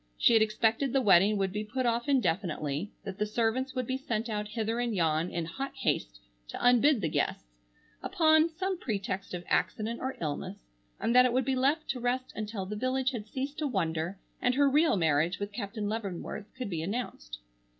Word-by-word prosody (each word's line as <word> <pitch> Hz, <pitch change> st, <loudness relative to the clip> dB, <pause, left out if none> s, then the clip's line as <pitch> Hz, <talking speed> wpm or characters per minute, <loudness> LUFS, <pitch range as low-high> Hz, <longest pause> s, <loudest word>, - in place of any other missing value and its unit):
She -, -, +5 dB
had 225 Hz, -, +6 dB
expected 225 Hz, +4 st, +1 dB
the 270 Hz, -, +4 dB
wedding 205 Hz, -1 st, +5 dB
would 195 Hz, -1 st, 0 dB
be 210 Hz, +2 st, -3 dB
put 250 Hz, +4 st, -2 dB
off 235 Hz, +3 st, 0 dB
indefinitely, 175 Hz, -, 0 dB
that 195 Hz, -1 st, -7 dB
the 210 Hz, -, +2 dB
servants 240 Hz, +5 st, 0 dB
would 255 Hz, -1 st, -1 dB
be 260 Hz, +2 st, -1 dB
sent 230 Hz, -3 st, -2 dB
out 210 Hz, -1 st, -2 dB
hither 225 Hz, +2 st, -2 dB
and 240 Hz, -3 st, -1 dB
yon 165 Hz, -1 st, +1 dB
in 170 Hz, -1 st, -3 dB
hot 270 Hz, +12 st, -5 dB
haste -, -, -1 dB, 0.3 s
to -, -, -6 dB
unbid 245 Hz, +1 st, +4 dB
the 165 Hz, -, +1 dB
guests, -, -, -1 dB, 0.6 s
upon 315 Hz, 0 st, +4 dB
some 370 Hz, +2 st, -3 dB
pretext 195 Hz, -, -3 dB
of 175 Hz, -, -6 dB
accident 225 Hz, +2 st, 0 dB
or 260 Hz, +1 st, -4 dB
illness, 150 Hz, -3 st, -4 dB, 0.4 s
and 235 Hz, -, 0 dB
that 250 Hz, 0 st, +8 dB
it 250 Hz, -, +1 dB
would 255 Hz, 0 st, +2 dB
be 265 Hz, 0 st, +1 dB
left 280 Hz, +5 st, +1 dB
to 260 Hz, -, -1 dB
rest 250 Hz, +1 st, -1 dB
until 215 Hz, -2 st, -4 dB
the 210 Hz, +3 st, -5 dB
village 255 Hz, +3 st, 0 dB
had 225 Hz, -4 st, -6 dB
ceased 275 Hz, +5 st, -4 dB
to 305 Hz, -, 0 dB
wonder 170 Hz, -, -1 dB, 0.2 s
and 250 Hz, 0 st, +2 dB
her 285 Hz, +1 st, +4 dB
real 300 Hz, -2 st, +4 dB
marriage 160 Hz, +1 st, +2 dB
with 205 Hz, 0 st, -4 dB
Captain 205 Hz, +1 st, -4 dB
Leavenworth 205 Hz, -1 st, -4 dB
could 250 Hz, -6 st, -4 dB
be 165 Hz, -2 st, -2 dB
announced. 165 Hz, -, -4 dB
220 Hz, 200 wpm, -30 LUFS, 190-255 Hz, 0.6 s, that